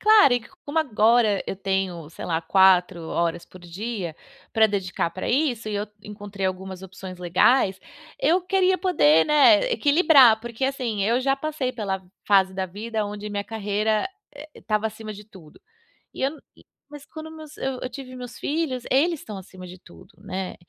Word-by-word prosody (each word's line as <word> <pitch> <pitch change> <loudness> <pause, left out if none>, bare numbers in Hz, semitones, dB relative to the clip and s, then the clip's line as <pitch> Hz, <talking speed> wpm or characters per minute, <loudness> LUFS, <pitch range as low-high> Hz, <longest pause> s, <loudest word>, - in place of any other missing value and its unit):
Claro, 425 - +6
e 245 - 0
co 300 +10 -18
como 290 +3 -2
agora 225 -6 +3
eu - - -3
tenho, 190 -5 -2
sei - - -9
lá, 165 -1 -1
4 180 0 +4
horas 170 0 -1
por 185 - -15
dia 180 -1 -5 0.4
pra 220 -1 +5
dedicar 185 -4 -2
pra 185 - -5
isso, 245 -5 0
e 210 - -3
eu 205 +1 -2 0.2
encontrei 205 -2 -5
algumas 190 0 -5
opções 190 -1 -9
legais, 190 +3 +3 0.4
eu 340 +6 +3
queria 375 0 +2
poder, 160 - +4
né, 305 - +5
equilibrar, 285 - +5
porque, 235 +2 -4
assim, 250 -7 -2
eu 235 +4 +2
já 270 +1 +1
passei 295 -3 -3
pela 195 -5 -3 0.2
fase 190 -2 +4
da 190 - -2
vida 215 +3 -4
onde 205 +1 -6
minha 205 -1 -3
carreira, 215 - -1 0.3
eh, 295 +2 -11
estava 215 0 -1
acima 215 0 -7
de 210 +1 -11
tudo. 185 -8 -17 0.5
E - - -7
eu 270 - +2
não 315 - -12 0.5
mas 290 -1 -11
quando 315 +1 -10
meus 310 -2 -11
eu 265 -1 -3
eu - - -3
tive 255 0 -9
meus 245 -2 -9
filhos, 290 -5 -2
eles 320 +4 +2
estão 210 -5 -9
acima 185 -1 -11
de 180 - -10
tudo, 85 - -17
né, 185 0 -5
215 Hz, 180 wpm, -24 LUFS, 190-275 Hz, 0.5 s, Claro